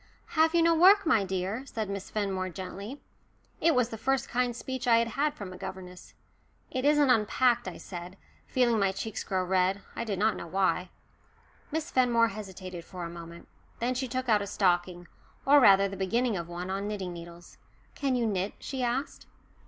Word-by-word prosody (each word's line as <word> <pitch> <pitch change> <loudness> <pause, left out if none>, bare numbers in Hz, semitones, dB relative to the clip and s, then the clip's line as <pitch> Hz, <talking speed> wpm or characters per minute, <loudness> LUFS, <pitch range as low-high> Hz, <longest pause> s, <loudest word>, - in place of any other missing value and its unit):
"Have 320 +1 +3
you 335 - +5
no 335 0 +5
work, 380 +4 +6
my 225 -11 +4
dear?" 190 +5 -3
said 220 -4 -3
Miss 200 -1 -5
Fenmore 195 -3 -2
gently. 195 - -7 0.6
It 330 -3 +3
was 250 -2 +2
the 225 - -7
first 270 +2 0
kind 245 -1 0
speech 260 +1 -5
I 230 -1 +6
had 230 0 +1
had 290 +5 0
from 195 -10 -7
a - - -9
governess. 185 -1 -9 0.6
"It 255 +1 -2
isn't 295 -2 +5
unpacked," 240 +1 +2
I 180 - -6
said, 180 +1 -8 0.3
feeling 240 -3 +2
my 195 -1 +2
cheeks 220 +2 -4
grow 185 -1 -1
red, 190 +2 +1
I - - -2
did 210 -4 -3
not 215 +3 +2
know - - -7
why. 185 0 0 0.8
Miss 320 +2 -3
Fenmore 235 -3 +3
hesitated 190 -4 -8
for 180 +1 -8
a 170 - -6
moment. 170 0 -10 0.3
Then 245 +2 0
she 260 +1 -2
took 255 +1 -3
out 215 -3 +4
a 200 - -4
stocking 175 -3 0 0.4
or 285 +1 +7
rather 200 -5 +6
the 195 - -6
beginning 220 +5 0
of 170 -2 -5
one 175 +2 -5
on 195 +1 -2
knitting 195 -4 -4
needles. 170 0 -11 0.3
"Can 275 -3 -1
you 240 -2 +1
knit?" 195 -2 -1
she 265 -2 -5
asked. 250 +5 -2
210 Hz, 190 wpm, -29 LUFS, 185-255 Hz, 0.8 s, or